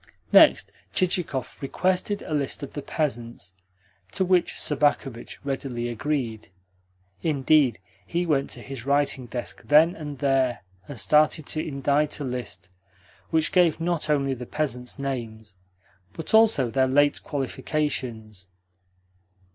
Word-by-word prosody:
Next, -, -, +6 dB, 0.2 s
Chichikov 175 Hz, -8 st, -1 dB
requested 185 Hz, +8 st, -1 dB
a -, -, -5 dB
list 140 Hz, -1 st, -1 dB
of 140 Hz, -, -7 dB
the 145 Hz, -, -4 dB
peasants; 120 Hz, -, -3 dB, 0.6 s
to 190 Hz, -, +1 dB
which 180 Hz, -1 st, +2 dB
Sobakevitch 145 Hz, -4 st, 0 dB
readily 130 Hz, -3 st, -3 dB
agreed. 120 Hz, -3 st, -3 dB, 0.7 s
Indeed, 145 Hz, -, +3 dB, 0.3 s
he 175 Hz, +1 st, -1 dB
went 140 Hz, -4 st, +1 dB
to -, -, -4 dB
his 135 Hz, -2 st, -8 dB
writing 140 Hz, -3 st, +1 dB
desk 120 Hz, +1 st, -6 dB
then 160 Hz, +4 st, +5 dB
and 145 Hz, -3 st, -7 dB
there, 135 Hz, -2 st, +1 dB, 0.3 s
and 140 Hz, -5 st, -6 dB
started 150 Hz, +5 st, +3 dB
to 155 Hz, -, -2 dB
indite 145 Hz, +1 st, 0 dB
a -, -, -3 dB
list 125 Hz, -6 st, -5 dB, 0.6 s
which 160 Hz, -1 st, +2 dB
gave 175 Hz, -4 st, +3 dB
not 165 Hz, -2 st, -1 dB
only 140 Hz, -2 st, +2 dB
the 125 Hz, -1 st, -7 dB
peasants' 125 Hz, -5 st, -3 dB
names, 115 Hz, -7 st, -5 dB, 0.6 s
but 160 Hz, -, -6 dB
also 215 Hz, -, +5 dB
their 130 Hz, +2 st, +2 dB
late 145 Hz, +2 st, +3 dB
qualifications. 125 Hz, -, -3 dB
140 Hz, 125 wpm, -25 LUFS, 125-155 Hz, 0.7 s, Next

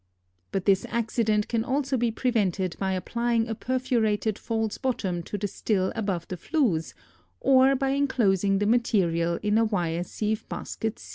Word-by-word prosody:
But 190 Hz, -2 st, -2 dB
this 195 Hz, -1 st, +4 dB
accident 225 Hz, -2 st, 0 dB
can 230 Hz, -2 st, 0 dB
also 270 Hz, +2 st, 0 dB
be 240 Hz, -1 st, +1 dB
prevented 205 Hz, -7 st, 0 dB
by 190 Hz, -1 st, 0 dB
applying 235 Hz, +4 st, 0 dB
a 225 Hz, -, -2 dB
perforated 225 Hz, -4 st, 0 dB
false 225 Hz, -2 st, -2 dB
bottom 195 Hz, -10 st, -1 dB
to 205 Hz, -, -5 dB
the 205 Hz, +1 st, -2 dB
still 190 Hz, -1 st, -1 dB
above 195 Hz, -6 st, -2 dB
the 185 Hz, -, -5 dB
flues, 200 Hz, -, 0 dB, 0.4 s
or 265 Hz, 0 st, +5 dB
by 270 Hz, 0 st, 0 dB
inclosing 205 Hz, -9 st, +2 dB
the 205 Hz, -, 0 dB
material 180 Hz, -8 st, +2 dB
in 210 Hz, +1 st, +3 dB
a 225 Hz, -, +4 dB
wire 175 Hz, -5 st, -1 dB
sieve 215 Hz, +4 st, -3 dB
basket 220 Hz, -1 st, -4 dB
C. -, -, -13 dB
215 Hz, 160 wpm, -26 LUFS, 190-240 Hz, 0.4 s, or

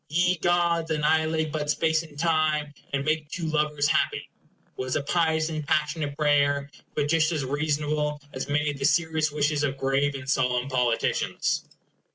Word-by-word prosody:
"Ye 180 Hz, +4 st, +2 dB
gods, 170 Hz, -1 st, +1 dB
annihilate 155 Hz, 0 st, +1 dB
but 150 Hz, -1 st, -3 dB
space 160 Hz, +1 st, +2 dB
and 155 Hz, -3 st, -13 dB
time, 155 Hz, -2 st, +1 dB, 0.2 s
And 140 Hz, 0 st, -1 dB
make 155 Hz, -1 st, 0 dB
two 170 Hz, +1 st, -4 dB
lovers 150 Hz, -2 st, 0 dB
happy!" 155 Hz, -, 0 dB, 0.4 s
was 130 Hz, 0 st, -3 dB
a -, -, 0 dB
pious 160 Hz, 0 st, +1 dB
and 155 Hz, -1 st, -3 dB
passionate 150 Hz, 0 st, -1 dB
prayer; 145 Hz, -1 st, +2 dB, 0.2 s
but 145 Hz, -, 0 dB
just 160 Hz, +1 st, +2 dB
as 150 Hz, -5 st, -1 dB
reasonable 150 Hz, +1 st, -1 dB
as 130 Hz, -, -5 dB
many 150 Hz, +1 st, +1 dB
of 140 Hz, -, -9 dB
the 135 Hz, -, 0 dB
serious 160 Hz, 0 st, +2 dB
wishes 145 Hz, 0 st, 0 dB
of 135 Hz, -1 st, -1 dB
grave 135 Hz, +1 st, +1 dB
and 135 Hz, -1 st, -7 dB
solemn 125 Hz, -1 st, +1 dB
politicians. 125 Hz, -3 st, 0 dB
150 Hz, 165 wpm, -26 LUFS, 145-160 Hz, 0.4 s, Ye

